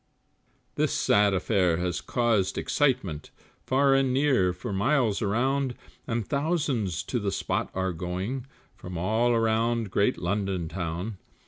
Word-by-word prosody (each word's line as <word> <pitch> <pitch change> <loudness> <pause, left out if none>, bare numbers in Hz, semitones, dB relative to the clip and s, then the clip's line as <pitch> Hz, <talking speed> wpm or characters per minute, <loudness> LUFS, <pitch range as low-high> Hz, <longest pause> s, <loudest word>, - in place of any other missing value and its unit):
This - - +1
sad 100 0 +3
affair 90 -3 +2
has 90 -1 -2
caused 115 -6 +1
excitement, 125 - 0 0.4
Far 135 +1 +4
and 135 -1 +3
near, 130 -9 +3
for 90 +3 -6
miles 115 +1 +1
around, 125 +5 0 0.3
And 115 -3 -2
thousands 140 - -1
to 125 - -2
the 100 -2 -1
spot 95 - -2
are 95 -1 -1
going 95 +10 -4 0.3
From 90 -1 -7
all 110 +7 +1
around 115 -1 +1
great 100 +6 +2
London 95 -2 -1
town. 90 +4 -4
105 Hz, 130 wpm, -27 LUFS, 95-125 Hz, 0.4 s, Far